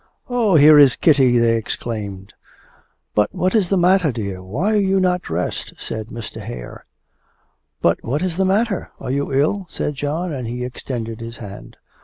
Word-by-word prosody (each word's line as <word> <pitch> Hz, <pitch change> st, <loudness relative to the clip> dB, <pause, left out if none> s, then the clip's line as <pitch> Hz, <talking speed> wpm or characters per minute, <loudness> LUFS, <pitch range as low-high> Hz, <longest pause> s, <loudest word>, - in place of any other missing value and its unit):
'Oh, 230 Hz, -7 st, +2 dB
here 150 Hz, 0 st, +8 dB
is 140 Hz, -3 st, +7 dB
Kitty!' 135 Hz, -6 st, +4 dB
they 115 Hz, -1 st, +3 dB
exclaimed. 105 Hz, -3 st, -5 dB, 0.8 s
'But 105 Hz, 0 st, +1 dB
what 185 Hz, +1 st, 0 dB
is 205 Hz, -6 st, +2 dB
the 195 Hz, -, +2 dB
matter, 180 Hz, -3 st, +3 dB
dear? 100 Hz, -5 st, -5 dB
Why 140 Hz, -, -1 dB
are 210 Hz, -, +3 dB
you 195 Hz, -1 st, +2 dB
not 180 Hz, -1 st, +1 dB
dressed?' 85 Hz, -, -4 dB
said 110 Hz, -1 st, -6 dB
Mr. 115 Hz, -2 st, -8 dB
Hare. -, -, -9 dB, 1.0 s
'But -, -, +2 dB
what 145 Hz, +8 st, -1 dB
is 180 Hz, -2 st, -2 dB
the 190 Hz, -, +2 dB
matter?... 200 Hz, +1 st, 0 dB
Are -, -, -4 dB
you 140 Hz, +1 st, -1 dB
ill?' 155 Hz, +8 st, +1 dB
said 150 Hz, -, -3 dB
John, 150 Hz, +5 st, -3 dB
and 125 Hz, -4 st, -4 dB
he 125 Hz, +2 st, -4 dB
extended 120 Hz, -2 st, -6 dB
his 115 Hz, +1 st, -7 dB
hand. 100 Hz, -2 st, -10 dB
140 Hz, 175 wpm, -20 LUFS, 115-180 Hz, 1.0 s, here